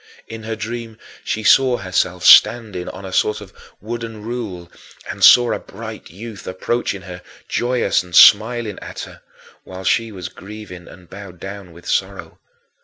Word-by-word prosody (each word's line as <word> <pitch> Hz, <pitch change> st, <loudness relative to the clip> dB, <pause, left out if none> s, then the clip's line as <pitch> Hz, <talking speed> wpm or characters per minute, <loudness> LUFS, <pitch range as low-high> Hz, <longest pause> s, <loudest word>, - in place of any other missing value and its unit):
In 115 Hz, 0 st, -8 dB
her 110 Hz, 0 st, -5 dB
dream 115 Hz, +1 st, -6 dB, 0.3 s
she 110 Hz, -, -3 dB
saw 130 Hz, +1 st, +4 dB
herself 90 Hz, -1 st, -2 dB
standing 110 Hz, -7 st, +5 dB
on 95 Hz, -, -9 dB
a 95 Hz, -, -8 dB
sort 105 Hz, -, +1 dB
of 100 Hz, -2 st, -13 dB, 0.3 s
wooden 115 Hz, 0 st, -7 dB
rule, 105 Hz, -7 st, -6 dB, 0.4 s
and -, -, -6 dB
saw 120 Hz, -1 st, +7 dB
a -, -, -3 dB
bright -, -, -10 dB
youth 105 Hz, +5 st, -10 dB
approaching 100 Hz, +1 st, -3 dB
her, 90 Hz, -2 st, -9 dB, 0.3 s
joyous 125 Hz, +1 st, 0 dB
and 90 Hz, -1 st, -9 dB
smiling 110 Hz, +1 st, +5 dB
at -, -, -8 dB
her, -, -, -11 dB, 0.4 s
while 95 Hz, 0 st, -10 dB
she 115 Hz, +4 st, +1 dB
was 90 Hz, -4 st, -7 dB
grieving 95 Hz, -1 st, -11 dB
and 90 Hz, -2 st, -15 dB
bowed 95 Hz, -1 st, -11 dB
down 100 Hz, -2 st, -9 dB
with 85 Hz, +1 st, -15 dB
sorrow. -, -, -3 dB
105 Hz, 160 wpm, -19 LUFS, 90-115 Hz, 0.4 s, saw